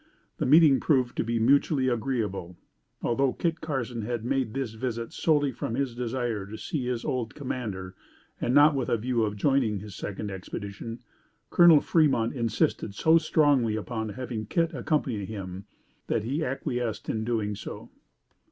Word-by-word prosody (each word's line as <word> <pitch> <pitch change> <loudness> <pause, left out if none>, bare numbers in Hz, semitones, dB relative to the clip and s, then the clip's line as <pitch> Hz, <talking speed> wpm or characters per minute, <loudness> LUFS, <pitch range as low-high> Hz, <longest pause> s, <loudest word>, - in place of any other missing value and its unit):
The - - 0
meeting 150 -1 +7
proved 130 -5 +1
to - - +1
be 115 +1 -1
mutually 135 +3 +3
agreeable. 110 -8 -2 0.5
Although 130 +2 +1
Kit 170 -1 -2
Carson 125 -6 -3
had 115 +1 -3
made 130 -4 -1
this 135 -5 -2
visit 115 0 -4
solely 145 -4 +2
from 115 -1 -4
his 135 -2 -1
desire 120 -4 -2
to 110 +2 -7
see 150 - -3
again 125 -1 -2
his 115 - -5
old 120 -3 -2
commander 105 -9 -4 0.5
and - - 0
not 145 +3 +6
with 135 -3 -1
a 120 - +2
view 120 +1 0
of 105 -1 0
joining 120 -2 +2
his 100 +1 -8
second 105 +1 -5
expedition, 100 +4 -7 0.5
Col. 170 -4 +7
Fremont 140 -8 +2
insisted 115 -4 -1
so 160 +6 +5
strongly 145 -8 +3
upon 110 0 -3
having 115 -2 -5
Kit 165 +6 0
accompany 130 -5 -1
him 95 -2 -7 0.4
that 110 - 0
he 140 +8 -1
acquiesced 125 -4 -3
in 110 - -1
doing 110 -3 -1
so. 100 - -8
120 Hz, 160 wpm, -27 LUFS, 110-135 Hz, 0.5 s, meeting